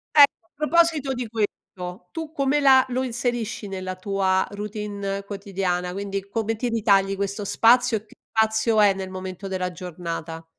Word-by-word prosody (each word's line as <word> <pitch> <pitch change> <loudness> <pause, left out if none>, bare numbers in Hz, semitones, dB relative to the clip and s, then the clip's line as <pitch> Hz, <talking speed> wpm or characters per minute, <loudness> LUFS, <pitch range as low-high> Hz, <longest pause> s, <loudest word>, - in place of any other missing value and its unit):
Ecco, 285 -6 +6
a - - -50
proposito 305 -2 +2
di 245 -1 -4
questo: 185 -4 -5
tu 320 -2 -5
come 280 -1 +2
la 265 -2 +6
lo 255 +1 0
inserisci 240 -3 -2
nella 185 -1 -4
tua 190 0 +1
routine 205 -1 -4
quotidiana? 190 -3 -2
Quindi 195 0 -4
come 225 +2 -1
ti 245 - -1
ritagli 200 -4 +3
questo 200 +1 -3
spazio 235 +2 +4
e 210 - -11
che - - -20
spazio 220 0 +2
è 200 -1 +6
nel 190 -1 -5
momento 185 +1 -6
della 185 -1 -2
giornata? 165 -1 -6
205 Hz, 160 wpm, -24 LUFS, 190-235 Hz, -, Ecco